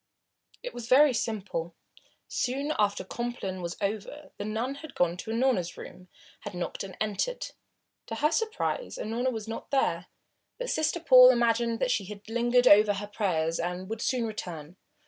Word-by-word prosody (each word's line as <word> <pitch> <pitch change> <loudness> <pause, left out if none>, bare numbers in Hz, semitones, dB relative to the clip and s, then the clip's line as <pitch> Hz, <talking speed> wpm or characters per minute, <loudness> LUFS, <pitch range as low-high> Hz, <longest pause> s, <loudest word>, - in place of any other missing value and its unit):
It - - -5
was 235 -1 -7
very 275 +3 +6
simple. 195 -7 -3 0.5
Soon 275 +4 -1
after 205 -1 +1
Compline 195 -3 -4
was 170 -1 -5
over 215 +9 -4
the - - -3
nun 225 +5 -2
had 315 -3 -10
gone 175 -1 +2
to 220 - -7
Unorna's 230 -7 0
room, 185 0 -11 0.3
had - - -8
knocked 175 - -4
and 190 -2 -8
had - - -1
entered. 350 - -3 0.6
To 225 - -4
her 300 +6 +2
surprise 450 +5 -2
Unorna 235 +4 -1
was 220 -2 -5
not 225 - -6
there, 180 -11 0 0.5
but - - -3
Sister 315 +2 0
Paul 255 -6 +9
imagined 235 -1 +2
that 255 -1 +2
she 200 - 0
had 205 +1 -10
lingered 240 +2 +2
over 205 +1 +7
her 205 +1 -4
prayers 170 -6 -1
and 180 +2 -3
would 225 0 -4
soon 250 -2 0
return. 175 -7 -6
225 Hz, 170 wpm, -28 LUFS, 190-255 Hz, 0.6 s, Paul